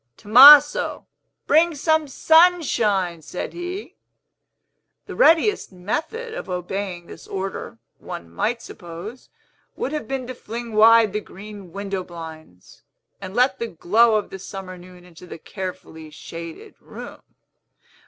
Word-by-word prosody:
"Tomaso, 285 +7 +7 0.4
bring 320 +2 +3
some 315 +1 +1
Sunshine!" 255 - +2
said 150 +4 -7
he. 360 +4 -7 1.1
The - - -9
readiest 410 - +3
method 320 - -5
of 195 - -7
obeying 180 0 -5
this - - -13
order, 190 - -6 0.2
one 85 - -8
might 220 - -3
suppose, 175 +7 -10 0.5
would 270 - -4
have 300 -8 -4
been 265 0 -4
to 255 - -7
fling 235 -1 -8
wide 220 -1 +5
the 210 - -2
green 200 -3 -12
window 195 -1 -4
blinds, 160 - -12 0.4
and 190 +1 -8
let 250 +2 +2
the 235 - -3
glow 220 +5 +2
of 210 - -2
the 190 - -8
summer 190 -1 -8
noon 180 0 -15
into 180 0 -15
the - - -9
carefully 160 -3 -8
shaded 165 +2 -10
room. - - -11
205 Hz, 130 wpm, -22 LUFS, 180-260 Hz, 1.1 s, Tomaso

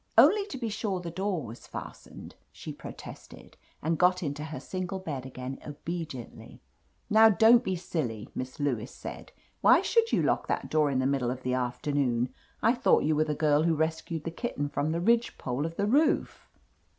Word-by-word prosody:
"Only 410 -1 +6
to 400 - -6
be 235 -3 -3
sure 205 -3 -2
the 170 -1 -6
door 185 -2 -2
was 115 +1 -10
fastened," - - -9 0.2
she - - -8
protested, - - -11 0.3
and 160 +1 0
got 180 +1 +3
into 150 0 -3
her 155 0 -6
single 185 +1 -4
bed 145 -8 -5
again 130 +1 -7
obediently. 150 -4 -7 0.5
"Now 220 +1 +7
don't 225 +3 +6
be 190 - -1
silly!" 135 - -3
Miss 130 +2 -6
Lewis 130 -4 -1
said - - -9 0.3
"Why - - +6
should 460 -1 +2
you - - +2
lock - - +1
that - - -2
door 155 -2 +3
in 135 - 0
the 130 - +1
middle 135 -3 +1
of 130 +1 -4
the 125 - -1
afternoon? 125 0 0 0.3
I 230 - +5
thought 250 +1 +3
you 155 +1 +2
were 155 +1 +2
the 150 -1 -2
girl 150 0 +3
wfio 165 -1 +2
rescued 160 0 -2
the 165 - -4
kitten 155 - -3
from 145 +1 -1
the 170 +1 -1
ridge 235 +4 +2
pole 130 +5 -2
of 165 - -9
the 200 - 0
roof 290 +8 +1
155 Hz, 190 wpm, -29 LUFS, 135-190 Hz, 0.5 s, Now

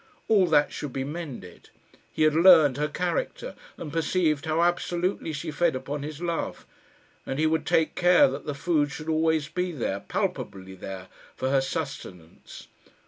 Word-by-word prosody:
All 200 -5 +4
that 150 -3 +3
should 150 - -5
be 135 - -2
mended. 140 - -8 0.4
He 155 - 0
had 155 -1 +4
learned 160 -5 +6
her 150 +1 0
character, - - -3 0.2
and 150 -3 -7
perceived 160 -2 +1
how 160 +1 +1
absolutely 175 0 -1
she 155 +2 -5
fed 170 -2 +1
upon 140 +3 -4
his 150 +1 -6
love; 170 -1 -3 0.6
and 135 - -4
he 155 - +2
would 155 -1 0
take 160 -1 +2
care 180 +11 +5
that - - -6
the 145 - -3
food 150 0 +1
should 155 +1 -7
always 160 -1 +1
be 180 +3 -2
there, 115 - -3
palpably 95 -1 -4
there, 95 0 -8 0.3
for 130 +1 -2
her 135 -1 +3
sustenance. 135 - -7
155 Hz, 165 wpm, -26 LUFS, 140-170 Hz, 0.6 s, learned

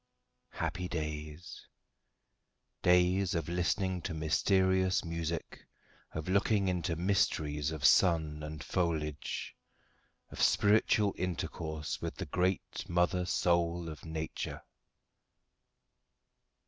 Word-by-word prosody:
Happy 90 0 -3
days! 75 0 -6 1.1
days 90 +1 +3
of 80 -3 -1
listening 90 +1 0
to 80 0 -4
mysterious 95 +4 +2
music, 85 -1 -4 0.5
of 80 +1 -5
looking 100 +1 +2
into 90 -2 0
mysteries 75 -5 +1
of 80 -3 -3
sun 80 -4 +4
and 75 0 -6
foliage, 80 -5 -2 0.8
of - - -5
spiritual 105 -1 +4
intercourse 80 -3 -3
with - - -4
the - - -5
great 90 +1 -1
mother 90 +1 +1
soul 85 -1 +1
of 80 -1 -8
nature. 80 -1 -5
85 Hz, 95 wpm, -32 LUFS, 80-90 Hz, 1.1 s, sun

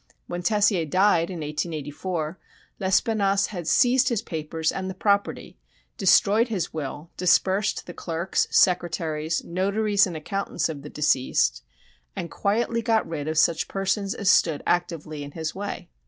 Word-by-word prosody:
When 175 0 -5
Tessier 205 -2 +2
died, 175 +1 +3
in 175 -4 -6
1884, 155 +2 -4 0.4
Lespinasse 195 0 +2
had 175 -4 -5
seized 255 +3 +4
his 230 -4 -1
papers 160 0 -2
and 190 0 -4
the 190 - -6
property, 200 - -1 0.4
destroyed 215 - +4
his 195 -7 -3
will, 155 +1 -6
dispersed 190 +3 +2
the 175 - -8
clerks, 170 +2 -1
secretaries, 165 -3 +1
"notaries" 200 +3 +1
and 170 -3 -5
accountants 195 +5 -2
of 150 -3 -6
the 150 - -9
deceased, 130 - +1 0.5
and 170 - -5
quietly 230 +3 0
got 225 -1 +1
rid 155 -3 -4
of 155 0 -2
such 160 0 +3
persons 195 +1 -1
as 200 - -4
stood 160 -5 +3
actively 165 -4 -2
in 145 0 -9
his 160 -2 -4
way. 200 +1 -6
175 Hz, 145 wpm, -25 LUFS, 160-200 Hz, 0.5 s, seized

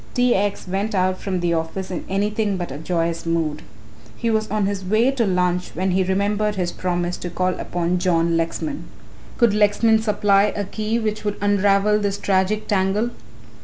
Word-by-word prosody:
T. 245 -1 +3
X. 200 -1 -1
went 200 +3 -2
out 185 0 +1
from 185 -3 -2
the 175 -1 +1
office 165 +4 -3
in 180 - -4
anything 205 +1 0
but 175 -5 -4
a 140 - -6
joyous 165 0 -1
mood. 160 -3 -1 0.6
He 230 - 0
was 220 0 0
on 210 0 0
his 195 -1 -2
way 215 +7 +2
to 240 -5 0
lunch 180 -1 0
when 185 +3 0
he 190 +1 +2
remembered 205 +3 0
his 180 -2 -1
promise 175 -1 -2
to 175 - -5
call 185 +1 -1
upon 175 +1 -1
John 170 -2 +2
Lexman. 165 - -2 0.5
Could 235 -4 +4
Lexman 215 +2 +3
supply 205 -2 +3
a 205 - -1
key 215 +3 -2
which 215 -2 -2
would 205 -1 -1
unravel 205 +1 +3
this 200 -1 -1
tragic 195 +2 0
tangle? 205 +4 +1
195 Hz, 180 wpm, -22 LUFS, 180-210 Hz, 0.6 s, Could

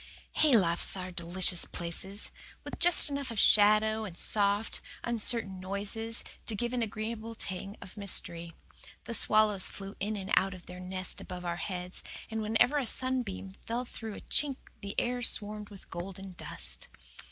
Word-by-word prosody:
Haylofts 195 - +3
are 185 0 -4
delicious 175 +1 +2
places, 190 +4 -4 0.3
with - - -7
just 350 -1 +10
enough 280 -2 -3
of 230 - -6
shadow 215 +2 +5
and 185 -5 -7
soft, 205 +1 +2 0.2
uncertain 225 -4 +1
noises 205 +4 0 0.2
to 225 - 0
give 240 +4 -3
an 245 - -1
agreeable 225 +1 -5
tang 195 0 -6
of 185 - -13
mystery. 170 -4 0 0.5
The 235 - -6
swallows 215 -4 +3
flew 195 0 -7
in 210 +2 -2
and 195 0 -6
out 195 0 +1
of 180 - -14
their 180 0 -10
nest 185 0 0
above 180 -1 -8
our 170 0 -2
heads, 180 +1 -3 0.3
and 220 0 -2
whenever 225 +6 +2
a 260 - -3
sunbeam 245 -8 -1
fell 240 +2 -2
through 220 -3 -8
a - - -10
chink 285 -2 0 0.3
the 200 0 -3
air 245 0 -2
swarmed 210 -2 -3
with 200 -2 -14
golden 190 +2 -7
dust. 60 - -4
205 Hz, 160 wpm, -30 LUFS, 185-225 Hz, 0.5 s, just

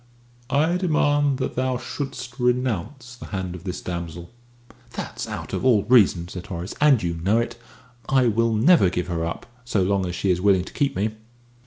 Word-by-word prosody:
"I 155 +6 +2
demand 145 -5 +2
that 130 - -3
thou 130 0 0
shouldst 130 -1 -6
renounce 125 - -1
the 120 - -10
hand 95 -3 -4
of 90 +1 -10
this 90 - -4
damsel." 85 -1 -6 0.6
"That's - - -5
out - - -6
of - - -2
all 120 -6 +4
reason," 105 -7 +4
said 90 -1 -8
Horace, 90 +1 -5
"and 145 -8 +5
you 85 -1 -1
know 95 +7 +1
it. 115 - -1 0.5
I 130 -2 +4
will 115 0 +2
never 115 - +5
give 90 0 -3
her 85 -2 -2
up, 85 - -4 0.2
so 110 -5 0
long 95 0 +1
as 90 - -4
she 95 - +1
is 90 0 0
willing 95 -2 +4
to - - -11
keep 140 -1 0
me." 105 +4 0
110 Hz, 190 wpm, -23 LUFS, 90-130 Hz, 0.6 s, and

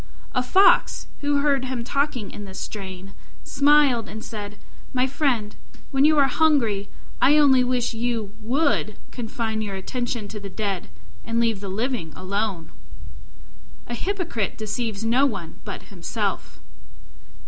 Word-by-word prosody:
A 250 - +2
Fox, 375 +10 +4
who 285 0 +1
heard 280 -2 +2
him 255 -2 -3
talking 260 -4 -1
in 205 - -7
this 190 -1 -8
strain, 195 -1 -7 0.3
smiled 280 -4 +4
and 220 +2 -7
said, 210 -1 -6 0.4
"My 255 0 +2
friend, 255 -6 0 0.4
when 270 +1 +4
you 310 0 +5
are 280 - +6
hungry, 250 -10 +2 0.3
I 295 +2 +6
only 270 -4 +6
wish 245 -1 0
you 225 -3 -2
would 250 -2 +1
confine 225 -2 -3
your 200 -2 -3
attention 235 +2 -3
to 210 - -6
the 200 -1 -7
dead 195 - -3 0.3
and 230 0 -1
leave 230 -3 +2
the 200 -1 -6
living 215 - -2
alone." 195 -2 -2 1.1
A 240 - -6
hypocrite 335 - -2
deceives 220 -1 -3
no 255 +5 +4
one 195 -10 -6
but 205 - -6
himself. 200 +3 -3
230 Hz, 140 wpm, -24 LUFS, 205-265 Hz, 1.1 s, are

